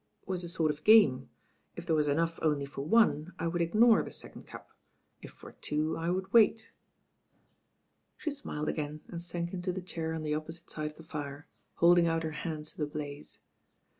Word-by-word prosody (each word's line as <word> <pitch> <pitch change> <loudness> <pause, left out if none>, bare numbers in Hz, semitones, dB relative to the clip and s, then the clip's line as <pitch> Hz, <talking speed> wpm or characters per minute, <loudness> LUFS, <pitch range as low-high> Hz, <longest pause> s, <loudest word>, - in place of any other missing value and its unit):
"It - - -34
was 185 -2 -2
a 175 - -5
sort 160 -2 +1
of 150 0 -9
game. 140 - +6 0.5
If - - -7
there 160 - +2
was 150 -1 +2
enough 165 +3 0
only 150 -3 +1
for 140 0 -7
one, 180 -2 +3
I 165 - -3
would 170 +1 -1
ignore 220 +7 +5
the - - -6
second - - -8
cup; - - -11 0.5
if - - -9
for - - -13
two» 155 +2 -2
I 165 +1 -2
would 190 +2 -2
wait." 225 -1 +4 1.5
She 310 - -3
smiled 155 - -5
again 150 0 -3
and 170 - -6
sank 170 0 -4
into 180 0 -2
the 185 - -4
chair 165 -3 -4
on 160 - -4
the 150 -1 -1
opposite 160 +2 -6
side 155 -1 -3
of 150 - -17
the 160 - -12
fire, 145 -2 -6 0.3
holding 170 0 +5
out 165 0 0
her 160 - -2
hands 150 0 -5
to - - -23
the 150 - 0
blaze. 145 -1 -7
165 Hz, 200 wpm, -31 LUFS, 150-175 Hz, 1.5 s, game